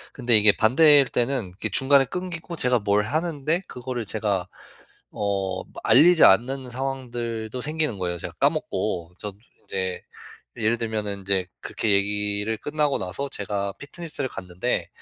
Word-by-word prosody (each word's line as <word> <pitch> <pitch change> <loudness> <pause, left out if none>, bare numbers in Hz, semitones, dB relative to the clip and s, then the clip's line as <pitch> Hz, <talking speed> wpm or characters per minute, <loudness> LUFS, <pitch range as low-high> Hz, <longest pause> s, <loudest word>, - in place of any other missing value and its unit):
근데 120 -4 +6
이게 105 -1 +8
반대일 140 +4 +5
때는 120 -7 -1
이게 - - -1
중간에 135 0 +3
끊기고 175 -1 -6
제가 125 -4 +1
뭘 100 0 +1
하는데 155 - -1
그거를 125 -2 -5
제가 100 -3 -2 0.6
어 95 -2 -2 0.2
알리지 175 0 +6
않는 125 +6 +3
상황들도 120 -3 -4
생기는 155 -7 -2
거예요, 90 -1 -2
제가 - - -6
까먹고. 85 -1 -1
저도 100 -2 -7 0.2
인제 95 -1 -4 0.5
이 115 - -5
예를 115 +2 +2
들면은 105 -3 -3
인제 95 -1 0
그렇게 110 - -1
얘기를 105 +2 0
끝나고 150 +1 -1
나서 95 +10 -4
제가 100 -1 -3
피트니스를 145 -3 -5
갔는데 90 -1 -3
115 Hz, 330 characters per minute, -24 LUFS, 100-140 Hz, 0.6 s, 이게